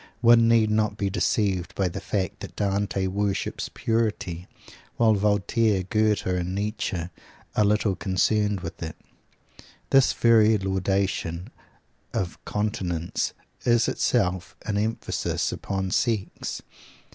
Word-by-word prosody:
One 115 -1 +6
need 115 -2 +4
not 110 -1 +1
be 100 -1 -1
deceived 95 -3 0
by 95 - +1
the 85 - -5
fact 95 -3 -2
that - - -9
Dante 100 -1 0
worships 100 +1 -2
"purity," 105 -6 -1 0.5
while 115 -2 +5
Voltaire, 105 0 +2
Goethe 105 +2 +1
and 90 0 -1
Nietzsche 100 -4 -2 0.5
are 105 - +4
little 105 -1 +2
concerned 105 +2 +1
with 85 - -7
it. 80 -2 -5 1.0
This 135 -1 +6
very 110 -2 +5
laudation 95 -3 -1 0.6
of 90 -3 -3
continence 90 -5 -2 0.3
is 120 -1 +3
itself 90 0 0
an 105 - -1
emphasis 110 +2 -1
upon 95 -1 -3
sex. 110 -4 -1
100 Hz, 115 wpm, -25 LUFS, 95-110 Hz, 1.0 s, One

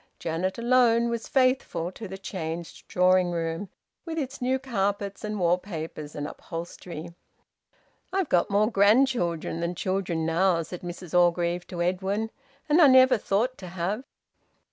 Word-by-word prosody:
Janet 170 +3 -2
alone 235 -1 +3
was 230 -1 -3
faithful 255 -10 +1
to 215 +3 -8
the 190 +1 -7
changed 170 -3 -6
drawing 180 0 +3
room, 165 +2 -3 0.3
with 330 -1 -5
its 275 -3 -4
new 255 +1 +1
carpets 200 -6 -2
and 210 -1 -3
wall 175 0 +3
papers 160 -5 -7
and 145 - -3
upholstery. 170 +1 -7 1.0
"I've 380 -3 0
got 175 - +2
more 210 +3 +2
grandchildren 200 -6 +2
than 170 +1 -2
children 185 -3 -1
now," 170 +1 +2
said 175 +2 -8
Mrs 175 -1 -8
Orgreave 175 0 +2
to 175 -1 -3
Edwin, 195 +5 -1 0.4
"and 315 +3 +5
I 300 - +9
never 260 -2 +6
thought 230 +7 0
to 185 - -8
have!" 185 +7 -3
190 Hz, 145 wpm, -26 LUFS, 170-230 Hz, 1.0 s, I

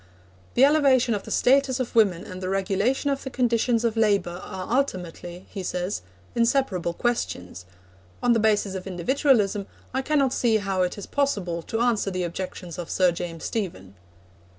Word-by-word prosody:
'The 260 - +7
elevation 275 -5 +4
of 205 - -1
the - - -11
status 265 0 +3
of 255 - -3
women 195 -6 +3
and 185 0 -8
the 185 - -3
regulation 200 +9 0
of 275 - -2
the 265 - -4
conditions 240 -2 +1
of 230 -1 +1
labour 200 -5 +1
are 190 +5 -4
ultimately,' 180 -8 -3
he 195 - -5
says, 180 +1 -3 0.3
'inseparable 230 -7 +1
questions. 90 - -2 0.6
On 245 - +5
the 230 - +2
basis 210 -2 +2
of 190 0 -6
individualism, 205 - +1 0.3
I 265 - 0
cannot 275 -2 +1
see 230 -3 +2
how 195 -3 -1
it 180 +2 0
is 205 - -6
possible 200 -12 -1
to 225 +7 -3
answer 235 -4 +2
the 185 -1 -2
objections 175 0 -5
of 175 - -5
Sir 185 -2 +3
James 170 -1 -6
Stephen.' 165 - -4
205 Hz, 170 wpm, -25 LUFS, 180-245 Hz, 0.6 s, The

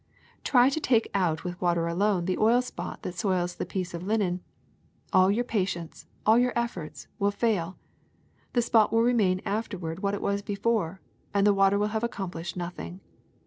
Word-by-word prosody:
Try 250 -1 +5
to 315 - -1
take 235 -6 +2
out 170 -5 0
with 180 0 -6
water 170 -2 +2
alone 180 +1 +1
the 185 0 -1
oil 235 +3 +4
spot 250 - -7
that 180 - -4
soils 180 -1 -1
a - - -1
piece 185 -2 -4
of 170 - -5
linen: 185 -2 0 0.7
all 185 0 +6
your 220 +5 +2
patience, 185 -8 -3 0.2
all 220 +2 +6
your 250 0 +2
efforts, 230 -10 -4
will 200 0 +3
fail; 200 -5 -1 0.8
the 240 - +3
spot 225 -2 +4
will 225 0 +3
remain 210 -7 +2
afterward 190 -6 -3
what 200 +1 0
it - - -6
was 200 0 0
before, 200 -3 -1 0.3
and 200 0 +4
the 205 - +5
water 195 0 +4
will 210 +1 +1
have 220 +1 -2
accomplished 180 -7 -4
nothing. 175 +1 -6
200 Hz, 180 wpm, -27 LUFS, 180-225 Hz, 0.8 s, all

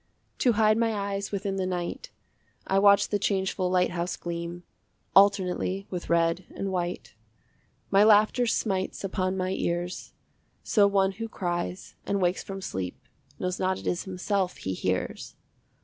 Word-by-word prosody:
To 245 - +4
hide 215 0 +3
my 225 -1 +1
eyes 200 0 -3
within 200 -1 -2
the 185 -1 -1
night 180 - -4 0.6
I 195 - +2
watch 200 0 +5
the 205 - 0
changeful 190 -2 0
lighthouse 180 -1 0
gleam 170 0 -5 0.5
Alternately 195 -1 +3
with 180 -2 -5
red 170 +1 +2
and 195 0 -3
white. 175 -1 -3 0.8
My 200 +1 +6
laughter 215 +3 +5
smites 195 -5 -1
upon 185 -1 -1
my 185 0 -1
ears, 175 -1 -3 0.5
So 205 -2 +4
one 195 -1 +2
who 225 +4 -6
cries 175 -1 -3
and 200 - -1
wakes 180 0 +1
from 195 0 -7
sleep 95 - -4 0.4
Knows 180 0 -3
not 185 0 +1
it - - -10
is 175 - -1
himself 190 0 -1
he 95 - -3
hears. 90 0 -3
190 Hz, 150 wpm, -27 LUFS, 180-200 Hz, 0.8 s, My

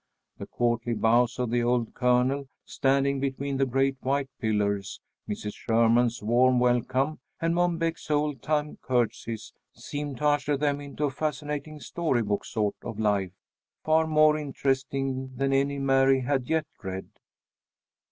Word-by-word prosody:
The - - -6
courtly 120 0 0
bows 120 +3 +3
of 125 -2 -1
the 120 0 +2
old 120 -1 0
Colonel, 130 +2 +1 0.2
standing 140 0 +1
between 140 0 -2
the 135 0 +2
great 135 +1 +1
white 135 +1 0
pillars, 100 -3 -1 0.3
Mrs. 105 0 -4
Sherman's 115 0 +2
warm 125 +3 +4
welcome, 130 +4 +1 0.2
and 165 0 +1
Mom 175 -1 +1
Beck's 165 -1 -3
old 150 -3 0
time 150 -1 -1
curtseys, 115 -2 -2 0.2
seemed 145 -2 -5
to 150 - -3
usher 145 -1 +2
them 145 0 0
into 145 +1 -6
a 145 - +1
fascinating 150 +1 -4
story 145 -7 -1
book 105 -1 -2
sort 105 -3 -1
of 110 -2 -7
life, 100 -4 +1 0.5
far 160 0 +3
more 155 -1 +4
interesting 135 -2 -2
than 135 +1 0
any 140 +1 +1
Mary 135 -1 +3
had 130 -1 -1
yet 160 -1 +1 0.2
read. 95 -1 -5
135 Hz, 145 wpm, -27 LUFS, 120-145 Hz, 0.5 s, warm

